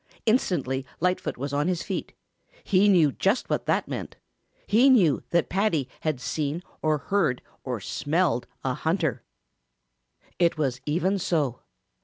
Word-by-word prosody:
Instantly 155 - +1 0.2
Lightfoot 180 +2 0
was 140 +3 -4
on 145 +3 +1
his 180 -2 -1
feet. - - -4 0.5
He 200 +1 +4
knew 165 -7 +5
just 195 - 0
what - - -1
that - - +1
meant. - - -5 0.5
He 240 +6 +5
knew 185 - +4
that 170 -1 +2
Paddy 180 -8 +1
had 155 -5 -1
seen 150 +5 -2 0.2
or 155 -1 +2
heard 150 -6 0 0.2
or 125 -3 -3
smelled 145 - 0 0.2
a 130 - 0
hunter. 155 - -1 1.2
It 170 -2 +3
was 130 -4 -1
even 185 +6 +1
so. 150 -9 0
160 Hz, 140 wpm, -26 LUFS, 140-185 Hz, 1.2 s, knew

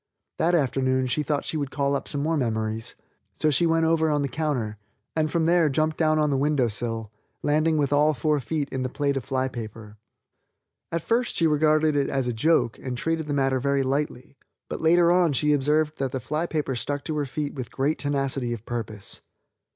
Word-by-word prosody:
That 175 +2 +3
afternoon 130 -3 +1
she 130 +4 0
thought 150 -1 -1
she 160 - -2
would 140 -2 -2
call 140 0 0
up - - -3
some 145 -1 -1
more 160 +2 +1
memories, 110 -4 -1 0.4
so 155 - +2
she 165 +4 +3
went 165 0 +2
over 160 -1 +2
on 145 -1 +1
the - - 0
counter, 125 -7 -2 0.4
and 155 -1 +1
from 165 0 +1
there 170 -2 +4
jumped 155 +3 +1
down 155 -1 +2
on 150 -1 +2
the 135 - +1
window 140 -4 +2
sill, 115 0 -3 0.3
landing 155 +2 +2
with 145 -1 +1
all 150 +1 +4
four 150 +4 +1
feet 145 +2 -2
in 130 - -3
the 130 - -1
plate 140 +1 -1
of 135 - -2
fly 130 +1 -1
paper. 110 -3 -8 0.9
At 165 -1 -2
first 240 +1 +1
she 165 - +2
regarded 155 0 +3
it 140 -1 +1
as 135 -2 -1
a 120 - -1
joke 120 -1 +2
and 125 -2 -5
treated 165 +3 -1
the 145 - -1
matter 135 -1 +1
very 140 +1 +1
lightly, 135 -1 -3 0.3
but - - -4
later 170 +1 +5
on 175 -4 +3
she 150 +2 +2
observed 150 +2 +1
that 135 -2 -1
the 130 - -2
fly 155 +6 -2
paper 150 -5 -2
stuck 145 +4 -3
to 155 -2 -3
her 145 - 0
feet 145 +2 -3
with 130 -4 -6
great 140 +4 0
tenacity 135 -4 -1
of 115 -1 -8
purpose. 110 -4 -5
145 Hz, 215 wpm, -25 LUFS, 130-155 Hz, 0.9 s, later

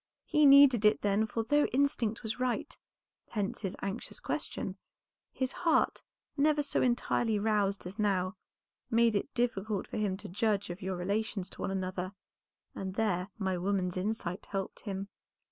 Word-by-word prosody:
He 300 -1 +5
needed 275 -5 +8
it 210 - +4
then, 205 +2 +2
for 225 +1 -2
though 290 +5 +3
instinct 250 -5 0
was 220 +2 -3
right, 250 -1 -1 0.5
hence 205 -3 -2
his 195 -3 -3
anxious 200 +4 -4
question, - - -3 0.6
his 260 -1 -2
heart, 335 -2 +2 0.3
never 295 0 +3
so 280 - 0
entirely 240 -2 +1
roused 205 -2 +1
as 190 +5 -7
now, 190 -2 +1 0.5
made 230 -1 +4
it 205 - -1
difficult 220 -4 0
for - - -6
him 205 -3 0
to - - -8
judge 205 0 0
of 175 +4 -8
your 190 0 -2
relations 195 +1 -2
to - - -10
one - - -1
another, 185 0 -3 0.6
and 190 -1 -5
there 195 -4 0
my 190 -3 -1
woman's 185 -1 0
insight 185 -1 -3
helped 195 -1 -4
him." 195 -1 -5
210 Hz, 160 wpm, -31 LUFS, 190-235 Hz, 0.6 s, needed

